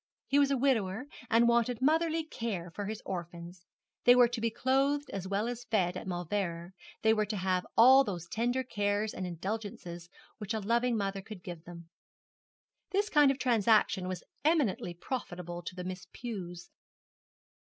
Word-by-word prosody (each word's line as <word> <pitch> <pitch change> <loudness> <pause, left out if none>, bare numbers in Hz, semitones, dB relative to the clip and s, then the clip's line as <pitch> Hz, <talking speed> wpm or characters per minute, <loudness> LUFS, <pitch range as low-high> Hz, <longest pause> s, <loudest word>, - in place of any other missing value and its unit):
He 280 - +3
was 280 -1 +4
a 275 - +2
widower, 240 -4 +1 0.2
and 230 +1 +5
wanted 235 0 +2
motherly 320 +3 +2
care 215 - -4
for 200 +4 -5
his 215 0 -5
orphans. 175 0 -7 0.4
They 245 - +7
were 245 -1 +7
to 240 -1 -4
be 230 - +2
clothed 275 +5 +1
as 190 -1 -4
well 200 +3 0
as 245 0 -5
fed 190 -6 +1
at 185 - -6
Mauleverer; 175 -1 -3 0.3
they 220 0 +5
were 215 -1 0
to 210 0 -3
have 185 -1 0
all 260 +4 +8
those 175 -7 -5
tender 245 +6 0
cares 205 -2 -1
and 185 - -4
indulgences 180 -1 -5 0.3
which 210 0 -3
a - - -1
loving 235 +3 +1
mother 195 -1 -2
could 190 -2 -10
give 170 -2 -8
them. 170 -1 -11 1.0
This 410 +2 0
kind 295 -2 +6
of 270 - +1
transaction 220 -6 +3
was 185 -1 -4 0.2
eminently 285 - +1
profitable 175 -5 -5
to 175 - -7
the 180 - -5
Miss 185 0 -6
Pews. 180 -7 -7
210 Hz, 170 wpm, -31 LUFS, 180-245 Hz, 1.0 s, all